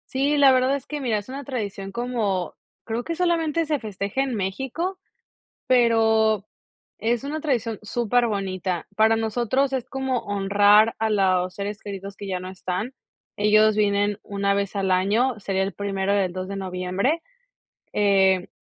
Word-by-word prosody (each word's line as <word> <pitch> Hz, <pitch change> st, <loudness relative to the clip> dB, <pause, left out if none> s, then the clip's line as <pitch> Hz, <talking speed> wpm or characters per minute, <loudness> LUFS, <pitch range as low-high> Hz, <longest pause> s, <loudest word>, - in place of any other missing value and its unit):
Sí, 280 Hz, +3 st, +2 dB
la 280 Hz, -2 st, +6 dB
verdad 260 Hz, +1 st, +3 dB
es 275 Hz, -, -6 dB
que, 300 Hz, -, -4 dB
mira, 240 Hz, -6 st, 0 dB
es 205 Hz, -, -12 dB
una 275 Hz, +1 st, -6 dB
tradición 200 Hz, -6 st, -5 dB
como, 225 Hz, -7 st, -1 dB, 0.3 s
creo 230 Hz, +1 st, -3 dB
que 335 Hz, -, -3 dB
solamente 330 Hz, -2 st, +1 dB
se 300 Hz, -2 st, 0 dB
festeja 205 Hz, +2 st, -3 dB
en 270 Hz, -3 st, -1 dB
México, 265 Hz, -, -3 dB, 0.7 s
pero 220 Hz, -4 st, +3 dB, 0.5 s
es 235 Hz, +2 st, 0 dB
una 300 Hz, +2 st, -4 dB
tradición 235 Hz, -7 st, -1 dB
superbonita, 200 Hz, -6 st, -1 dB
para 220 Hz, +1 st, +4 dB
nosotros 240 Hz, +4 st, 0 dB
es 260 Hz, -3 st, -2 dB
como 265 Hz, -1 st, -2 dB
honrar 205 Hz, +2 st, +4 dB
a 220 Hz, 0 st, 0 dB
los 185 Hz, -3 st, +2 dB
seres 205 Hz, +1 st, -5 dB
queridos 195 Hz, -1 st, -7 dB
que 205 Hz, -, -7 dB
ya 185 Hz, -1 st, -2 dB
no 185 Hz, +1 st, -7 dB
están. 190 Hz, +6 st, -4 dB, 0.4 s
Ellos 215 Hz, +1 st, +4 dB
vienen 205 Hz, -1 st, +1 dB
1 200 Hz, 0 st, 0 dB
vez 200 Hz, 0 st, -2 dB
al 195 Hz, -1 st, 0 dB
año, 210 Hz, +7 st, +2 dB
sería 195 Hz, -1 st, -1 dB
el 195 Hz, +1 st, -1 dB
primero 195 Hz, -1 st, -1 dB
y -, -, +2 dB
el 180 Hz, -1 st, -3 dB
2 185 Hz, 0 st, -4 dB
de 200 Hz, -, -5 dB
noviembre, 190 Hz, -, -1 dB, 0.7 s
eh, 190 Hz, -2 st, +3 dB
215 Hz, 160 wpm, -24 LUFS, 195-255 Hz, 0.7 s, la